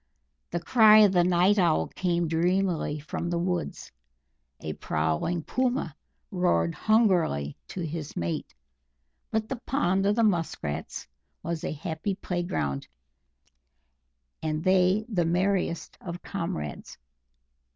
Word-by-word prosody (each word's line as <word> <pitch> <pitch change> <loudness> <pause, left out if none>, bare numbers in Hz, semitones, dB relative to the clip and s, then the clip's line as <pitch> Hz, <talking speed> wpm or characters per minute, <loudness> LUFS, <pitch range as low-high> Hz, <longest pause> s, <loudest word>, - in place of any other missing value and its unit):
The 175 - -2
cry 215 +4 +6
of 205 - +5
the 180 -2 +4
Night 180 +3 +3
Owl 170 -4 +3
came 175 -2 0
dreamily 175 -1 +1
from 155 +3 -4
the 170 - 0
woods; 175 0 -3 0.7
a - - -5
prowling 80 - -1
Puma 250 - -1 0.4
roared 85 - +1
hungrily 180 - +2
to 185 - -6
his 160 -2 -5
mate, 85 -1 -3 0.7
but 220 0 -1
the 265 - -3
pond 195 -7 +1
of 205 - +3
the 230 - +2
Musk 175 -7 0
Rats 75 0 -4 0.4
was 170 -1 -3
a - - -2
happy 160 +5 -3
playground, 175 - -3 1.5
and 155 0 -2
they 185 +3 +3
the 195 -7 0
merriest 180 0 0
of 175 -1 -7
comrades. 120 - -5
175 Hz, 120 wpm, -27 LUFS, 160-195 Hz, 1.5 s, cry